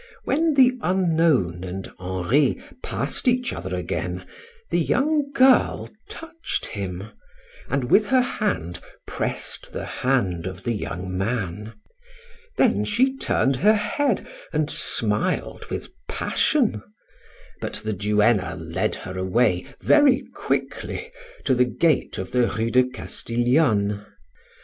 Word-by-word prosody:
When 315 Hz, +1 st, +1 dB
the 255 Hz, -2 st, +5 dB
unknown 160 Hz, -, +2 dB
and 95 Hz, +1 st, -6 dB
Henri 95 Hz, -, +1 dB, 0.2 s
passed -, -, -3 dB
each 250 Hz, +1 st, +2 dB
other -, -, -4 dB
again, -, -, -3 dB, 0.5 s
the -, -, +2 dB
young 295 Hz, 0 st, +1 dB
girl 260 Hz, -2 st, +4 dB, 0.2 s
touched 330 Hz, 0 st, -5 dB
him, 100 Hz, 0 st, -5 dB, 0.6 s
and 135 Hz, +1 st, 0 dB
with 210 Hz, 0 st, +5 dB
her 255 Hz, +1 st, +4 dB
hand 135 Hz, -, -2 dB, 0.3 s
pressed -, -, -4 dB
the -, -, -4 dB
hand 95 Hz, -10 st, 0 dB
of 95 Hz, 0 st, -7 dB
the 120 Hz, -, -1 dB
young 90 Hz, -4 st, -4 dB
man. 105 Hz, 0 st, -2 dB, 0.8 s
Then -, -, +3 dB
she 260 Hz, +6 st, +2 dB
turned 135 Hz, -, +1 dB
her 210 Hz, +9 st, +5 dB
head 280 Hz, +7 st, 0 dB, 0.3 s
and -, -, 0 dB
smiled -, -, 0 dB
with -, -, -4 dB, 0.2 s
passion, 240 Hz, -, +1 dB, 0.8 s
but -, -, -4 dB
the 110 Hz, -, -1 dB
duenna 105 Hz, +1 st, +2 dB
led -, -, -2 dB
her 95 Hz, 0 st, -5 dB
away 95 Hz, -1 st, +1 dB
very 285 Hz, -3 st, +5 dB
quickly 475 Hz, -, -3 dB, 0.3 s
to 135 Hz, -, +3 dB
the 125 Hz, 0 st, +4 dB
gate 155 Hz, +6 st, +1 dB
of 95 Hz, 0 st, -5 dB
the 125 Hz, -1 st, +3 dB
Rue 115 Hz, +1 st, -1 dB
de 125 Hz, +1 st, +5 dB
Castiglione. 120 Hz, -4 st, 0 dB
125 Hz, 120 wpm, -24 LUFS, -, 0.8 s, the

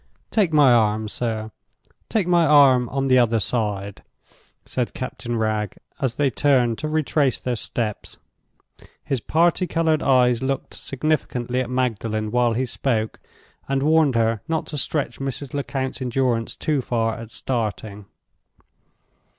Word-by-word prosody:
"Take 200 Hz, -7 st, +2 dB
my 145 Hz, -5 st, +6 dB
arm, 110 Hz, -1 st, +2 dB
sir—take 110 Hz, -, -5 dB
my 175 Hz, -1 st, +4 dB
arm 140 Hz, -5 st, +5 dB
on 135 Hz, 0 st, -1 dB
the 130 Hz, -1 st, +5 dB
other 115 Hz, -2 st, +3 dB
side," 100 Hz, -2 st, -2 dB, 0.6 s
said 125 Hz, -2 st, -3 dB
Captain 120 Hz, -2 st, -4 dB
Wragge, 110 Hz, -1 st, -1 dB, 0.2 s
as 130 Hz, -5 st, -1 dB
they 140 Hz, -1 st, +1 dB
turned 125 Hz, -4 st, +2 dB
to 155 Hz, -, -3 dB
retrace 150 Hz, -4 st, +1 dB
their 125 Hz, -1 st, -2 dB
steps. 110 Hz, -1 st, -4 dB, 0.9 s
His 135 Hz, -3 st, -1 dB
party 170 Hz, -, +2 dB
colored 160 Hz, -2 st, +1 dB
eyes 125 Hz, -3 st, +3 dB
looked 135 Hz, 0 st, -3 dB
significantly 130 Hz, -3 st, -2 dB
at 125 Hz, -, -4 dB
Magdalen 110 Hz, -4 st, -1 dB
while 120 Hz, -1 st, +2 dB
he 130 Hz, +3 st, 0 dB
spoke, 115 Hz, -3 st, -2 dB, 0.5 s
and 135 Hz, 0 st, 0 dB
warned 155 Hz, -3 st, +3 dB
her 115 Hz, -2 st, +1 dB
not 160 Hz, -1 st, -1 dB
to -, -, -2 dB
stretch 145 Hz, +2 st, -2 dB
Mrs. 135 Hz, 0 st, -4 dB
Lecount's 135 Hz, -2 st, -3 dB
endurance 125 Hz, -2 st, 0 dB
too 150 Hz, -3 st, 0 dB
far 115 Hz, -2 st, -1 dB
at 115 Hz, 0 st, -8 dB
starting. 110 Hz, -4 st, -4 dB
125 Hz, 135 wpm, -22 LUFS, 115-140 Hz, 0.9 s, my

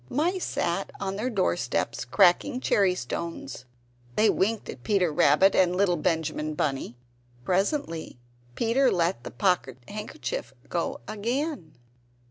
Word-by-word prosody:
The -, -, -8 dB
mice 350 Hz, +6 st, +1 dB
sat 185 Hz, +3 st, -1 dB
on 195 Hz, -1 st, -3 dB
their 225 Hz, +5 st, -1 dB
doorsteps 175 Hz, -, -1 dB
cracking 180 Hz, -, +3 dB
cherry 195 Hz, -7 st, +2 dB
stones; 165 Hz, -2 st, -5 dB, 0.5 s
they 220 Hz, -, +5 dB
winked 215 Hz, +3 st, 0 dB
at 125 Hz, -, -8 dB
Peter 180 Hz, -, +1 dB
Rabbit 150 Hz, +7 st, +5 dB
and 180 Hz, -1 st, +3 dB
little 185 Hz, -2 st, +3 dB
Benjamin 155 Hz, -2 st, -1 dB
Bunny. 135 Hz, -5 st, -2 dB, 0.5 s
Presently 185 Hz, -, -1 dB, 0.4 s
Peter 245 Hz, +3 st, +3 dB
let 175 Hz, +1 st, 0 dB
the -, -, -6 dB
pocket 170 Hz, -, 0 dB
handkerchief 220 Hz, -, -5 dB
go -, -, -2 dB
again. 230 Hz, -, -3 dB
190 Hz, 125 wpm, -27 LUFS, 160-220 Hz, 0.5 s, they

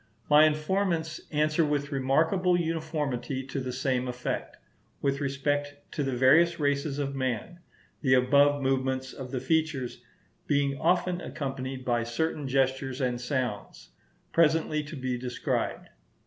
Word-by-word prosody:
My 150 Hz, +1 st, +8 dB
informants 160 Hz, +1 st, 0 dB
answer 155 Hz, +2 st, +2 dB
with 145 Hz, -1 st, -1 dB
remarkable 160 Hz, +7 st, +2 dB
uniformity 150 Hz, -6 st, -2 dB
to 135 Hz, +1 st, -4 dB
the 130 Hz, -1 st, -3 dB
same 130 Hz, 0 st, -1 dB
effect, 125 Hz, 0 st, -4 dB, 0.4 s
with 140 Hz, +1 st, 0 dB
respect 145 Hz, +1 st, -1 dB, 0.2 s
to -, -, -3 dB
the 135 Hz, -2 st, -1 dB
various 165 Hz, +7 st, +5 dB
races 145 Hz, 0 st, 0 dB
of 140 Hz, -1 st, -2 dB
man; 130 Hz, +5 st, -3 dB, 0.4 s
the 130 Hz, -3 st, +4 dB
above 140 Hz, +2 st, +4 dB
movements 130 Hz, 0 st, 0 dB
of 130 Hz, -2 st, -7 dB
the 130 Hz, -1 st, -2 dB
features 140 Hz, -2 st, -1 dB, 0.5 s
being 140 Hz, -1 st, +2 dB
often 180 Hz, +1 st, +1 dB
accompanied 135 Hz, -4 st, -5 dB
by 120 Hz, -1 st, +1 dB
certain 145 Hz, +5 st, -2 dB
gestures 130 Hz, 0 st, 0 dB
and 125 Hz, -2 st, -1 dB
sounds, 125 Hz, -, -3 dB, 0.4 s
presently 160 Hz, -1 st, +3 dB
to 155 Hz, -, -8 dB
be 130 Hz, -2 st, -2 dB
described. 125 Hz, 0 st, -2 dB
140 Hz, 135 wpm, -28 LUFS, 130-155 Hz, 0.5 s, My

